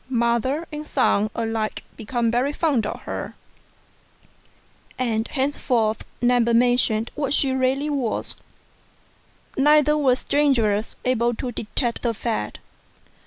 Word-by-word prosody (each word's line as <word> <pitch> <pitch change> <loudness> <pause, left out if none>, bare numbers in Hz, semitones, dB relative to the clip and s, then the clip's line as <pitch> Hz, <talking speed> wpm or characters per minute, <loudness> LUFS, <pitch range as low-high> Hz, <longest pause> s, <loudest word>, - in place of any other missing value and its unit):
Mother 245 +6 0
and 300 0 -6
son 215 -5 +2
alike 225 -1 -2
became 235 0 -1
very 255 +5 +1
fond 290 -9 +1
of - - -6
her, - - -5 1.6
and 225 -3 -1
henceforth 250 -5 0 0.2
never 240 -1 +3
mentioned 240 -2 +2
what 285 -1 0
she 270 - +2
really 265 +2 +1
was; 260 -6 -1 1.2
neither 300 +1 +4
were 275 -4 +3
strangers 240 -7 +1
able 240 -1 +1
to 250 +2 -4
detect 235 +2 -2
the 235 -2 -1
fact. 225 +1 -3
245 Hz, 115 wpm, -23 LUFS, 230-275 Hz, 1.6 s, neither